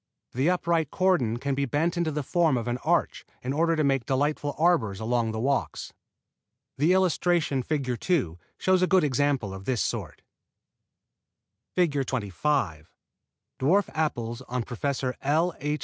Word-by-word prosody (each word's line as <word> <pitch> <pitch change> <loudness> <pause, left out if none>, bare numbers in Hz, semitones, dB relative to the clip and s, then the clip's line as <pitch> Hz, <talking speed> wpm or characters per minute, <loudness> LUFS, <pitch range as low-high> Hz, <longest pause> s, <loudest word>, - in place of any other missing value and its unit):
The 135 +7 +2
upright 170 -4 +1
cordon 165 -13 +1
can 140 +3 -2
be 140 +1 0
bent 155 +7 0
into 170 -2 0
the 150 -1 -2
form 160 -2 +2
of 120 0 -3
an 120 +1 -1
arch - - 0 0.2
in 130 +2 -2
order 165 +2 +2
to 155 - +1
make 135 -3 +1
delightful 145 +1 0
arbors 145 - +2
along 115 0 0
the 110 - -4
walks. 135 +4 -1 0.9
The 155 +5 +4
illustration, 175 -6 +2
Fig. 125 -3 -2
2, 95 - 0 0.2
shows 185 -1 +2
a 185 - +3
good 185 -2 +4
example 135 -6 0
of 95 0 -9
this 125 -1 0
sort. - - -3 1.5
[Illustration: 165 -6 +2
FIG. 135 - -4
25 100 - -1 0.7
DWARF 185 +10 +2
APPLES 120 -7 -2
ON 125 -1 -2
PROF. 130 +2 -2
L. 160 +5 +1
H. 150 +2 -2
140 Hz, 155 wpm, -26 LUFS, 120-165 Hz, 1.5 s, The